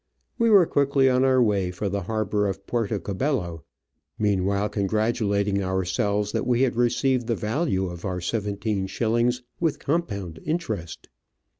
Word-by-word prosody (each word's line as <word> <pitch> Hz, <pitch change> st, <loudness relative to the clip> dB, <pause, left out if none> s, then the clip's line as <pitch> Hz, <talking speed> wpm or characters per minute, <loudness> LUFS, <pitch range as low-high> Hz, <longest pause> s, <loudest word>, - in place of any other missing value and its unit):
We 230 Hz, 0 st, +4 dB
were 200 Hz, -5 st, +7 dB
quickly 140 Hz, -3 st, +3 dB
on 125 Hz, +1 st, +3 dB
our 130 Hz, -1 st, +4 dB
way 100 Hz, -5 st, +1 dB
for 90 Hz, +3 st, -3 dB
the 100 Hz, +1 st, -2 dB
harbour 105 Hz, +1 st, -1 dB
of 95 Hz, 0 st, -5 dB
Puerto 115 Hz, -2 st, -1 dB
Cabello, 95 Hz, -, -2 dB, 0.5 s
meanwhile 100 Hz, 0 st, +1 dB
congratu 110 Hz, +2 st, 0 dB
lating 100 Hz, 0 st, +1 dB
ourselves 100 Hz, +2 st, 0 dB
that 125 Hz, -, -2 dB
we 125 Hz, +1 st, +3 dB
had 125 Hz, -3 st, +1 dB
received 120 Hz, +1 st, +1 dB
the 115 Hz, -, +1 dB
value 110 Hz, -, -1 dB
of 85 Hz, -2 st, -7 dB
our 90 Hz, -2 st, -2 dB
seventeen 100 Hz, +1 st, -2 dB
shillings 120 Hz, +4 st, 0 dB, 0.2 s
with 165 Hz, -3 st, +1 dB
compound 100 Hz, -, -2 dB
interest. 110 Hz, -, -4 dB
105 Hz, 150 wpm, -25 LUFS, 100-125 Hz, 0.5 s, were